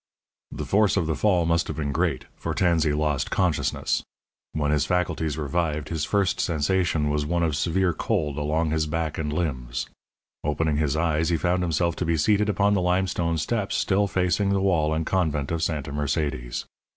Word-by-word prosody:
The - - -5
force 105 0 +3
of 90 - +2
the 80 - 0
fall 90 -5 +2
must 85 0 +1
have - - -5
been 70 -2 -1
great, - - 0
for - - -4
Tansey 85 -4 +2
lost 75 -2 0
consciousness. 90 -5 0 0.5
When 75 -1 0
his 75 -1 +1
faculties 80 -4 0
revived 75 0 -1
his 80 -3 -1
first 100 -2 +1
sensation 80 -1 +1
was 75 0 0
one 85 +3 0
of 80 -3 +1
severe 90 +4 +1
cold 80 -6 -1
along 75 +2 0
his 80 -1 0
back 80 0 -2
and 75 -2 -2
limbs. 65 -7 -2 0.6
Opening 75 0 0
his 75 -1 0
eyes, 80 0 +1
he 85 - +2
found 90 +2 +1
himself 85 0 0
to 90 - -1
be 85 0 +1
seated 105 +7 +2
upon 100 0 +2
the 100 - +2
limestone 90 -2 0
steps 100 +6 -1
still 100 +1 +2
facing 90 +1 +1
the 100 0 +2
wall 85 -6 +2
and 80 +1 -1
convent 80 -7 0
of 85 -1 -1
Santa 75 -4 -2
Mercedes. 70 -4 -2
80 Hz, 185 wpm, -25 LUFS, 75-90 Hz, 0.6 s, force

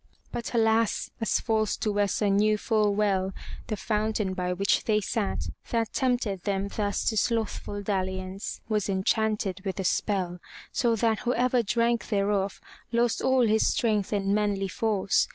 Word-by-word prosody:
But 235 +1 -4
alas! 225 -1 +2
as 225 - +2
false 220 -3 0
Duessa 205 0 +1
knew 210 +2 +3
full 210 -2 +1
well, 195 -2 +1 0.3
the 215 - -2
fountain 215 -2 -1
by 180 -1 -2
which 195 +3 +1
they 215 -1 +3
sat, 210 0 -2 0.3
that 230 -2 -1
tempted 245 -7 0
them 200 0 -1
thus 205 -2 -1
to 220 - +1
slothful 215 -2 -1
dalli 190 -2 -1
ance, 185 +1 -6
was 210 -2 0
enchanted 200 0 0
with 195 0 -3
a - - -1
spell, 180 -2 0 0.3
so 235 -3 +2
that 225 0 +1
whoever 250 0 +2
drank 235 +2 0
thereof 200 -2 0 0.3
lost 235 0 +1
all 260 -2 +3
his 220 0 +3
strength 210 -4 0
and 200 -1 +1
manly 205 -2 +1
force. 205 -1 +1
210 Hz, 155 wpm, -27 LUFS, 195-225 Hz, 0.3 s, knew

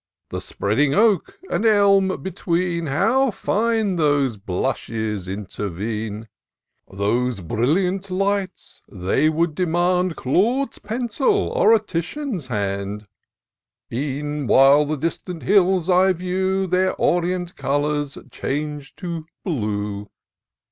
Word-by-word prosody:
The - - -4
spreading 135 +8 0
oak 225 - +2
and - - -1
elm 200 -3 +4
between, 175 -2 -1
How 245 - +2
fine 220 -2 0
those 145 -6 +2
blushes 105 +1 -3
intervene! 105 +2 -4 0.6
Those 110 +4 0
brilliant 180 - 0
lights! 195 0 -2
— - - -28
they 100 +11 +1
would 160 +1 0
demand 180 +1 +1
Claude's 230 - 0
pencil, 250 - 0
or - - +3
a 225 - +6
Titian's 195 - -4
hand: 100 -2 -3 0.9
E'en 145 +2 -3
while 140 +4 +6
the 155 +1 -2
distant 165 +3 -4
hills 190 -3 +3
I 185 +1 +4
view, 185 +2 -1
Their 185 +1 +1
orient 180 0 0
colours 145 0 -1
change 145 +1 -4
to 170 -4 -6 0.2
blue. 105 - -2
165 Hz, 105 wpm, -22 LUFS, 125-190 Hz, 0.9 s, a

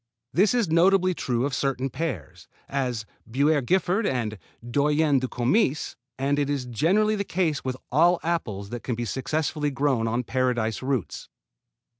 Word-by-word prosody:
This 200 +7 +3
is 235 -5 +2
notably 185 +3 +4
true 125 -6 -1
of 140 - -2
certain 135 0 -1
pears, 125 - -5 0.2
as 125 -5 -2 0.2
Buerré 145 +4 +2
Giffard 190 - +1
and 110 -5 -2 0.3
Doyenne 145 +2 +2
du 130 - -2
Comice, 135 - +1 0.2
and 140 +2 0
it 145 -1 0
is 140 -3 -1
generally 185 - +2
the 200 - -1
case 170 -6 -1
with 130 -1 -3
all 170 +6 +4
apples 110 - -2
that 120 -1 -5
can 125 - -3
be 120 +1 -3
successfully 150 +5 -1
grown 135 -4 0
on 120 +2 0
Paradise 120 -3 0
roots. 130 -6 -3
140 Hz, 155 wpm, -25 LUFS, 125-165 Hz, 0.3 s, notably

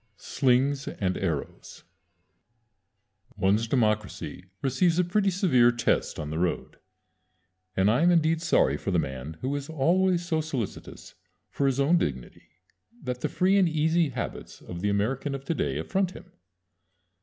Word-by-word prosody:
XIV 110 -2 -44
"SLINGS 135 +1 +1
AND 95 -2 0
ARROWS" 80 -7 -4 1.5
One's 105 +4 +2
democracy 110 -6 -1 0.2
receives 165 +6 +2
a 180 - +4
pretty 195 +3 +1
severe 150 - +4
test 120 -1 0
on 75 -1 -5
the 80 - -2
road, 90 0 -2 1.0
and 95 +1 +3
I 115 +7 +3
am 175 - +5
indeed 165 -1 +2
sorry 75 - +2
for 100 - -4
the 90 - +1
man 70 0 -4
who 135 +3 -2
is 145 +1 -5
always 175 +4 +2
so 160 -3 0
solicitous 135 -9 -6 0.4
for 140 - 0
his 135 0 0
own 160 +5 +4
dignity 65 -5 -5 0.5
that 125 -1 -4
the - - -1
free 190 +2 +2
and 180 -3 +3
easy 160 +1 +2
habits 125 -2 -6
of 85 -1 -8
the 105 - 0
American 125 +8 -1
of 135 0 -8
Today 165 - -1
affront 190 -2 -1
him. - - -13
135 Hz, 155 wpm, -27 LUFS, 100-165 Hz, 1.5 s, am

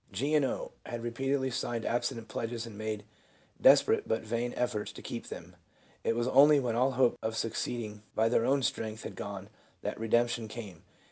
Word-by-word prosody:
1 - - -24
G. 140 +9 0
and 150 - +5
0. 130 - -2 0.2
had 120 -1 -5
repeatedly 130 +3 0
signed 120 -2 -2
abstinence 120 -1 -1
pledges, 115 +1 -3
and 115 - -9
had - - -11
made 110 -1 -3 0.6
desperate, - - +6
but 110 - 0
vain, 115 +2 -1
efforts 110 -4 -1
to - - -11
keep - - -5
them. - - -9 0.5
It 115 - +1
was 120 +1 0
only 145 +3 +7
when 120 -4 -1
all 130 +3 +3
hope 125 -1 +3
of 110 0 -2
succeeding 110 -1 -3
by 110 +1 +3
their 115 0 +3
own 135 +2 +2
strength 110 -2 -2
had - - -6
gone 100 -1 -6 0.4
that - - -3
redemption 120 0 +1
came. 105 -7 -8
115 Hz, 195 wpm, -31 LUFS, 110-125 Hz, 0.6 s, only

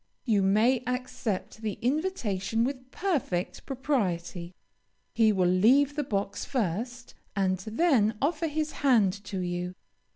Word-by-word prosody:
You 215 -5 +3
may 220 +6 +3
accept 250 -5 -3
the 215 -2 -2
invitation 235 - 0
with 255 0 -3
perfect 270 - -2
propriety. 185 - -2 0.6
He 225 -2 +4
will 190 -3 +2
leave 255 +11 +4
the 295 - 0
box 200 -5 -2
first 240 +1 -3 0.2
and 190 -2 +1
then 225 - +2
offer 315 +4 0
his 310 0 -2
hand 230 -9 +4
to 190 -2 -3
you. 180 0 -3
225 Hz, 125 wpm, -28 LUFS, 190-270 Hz, 0.6 s, He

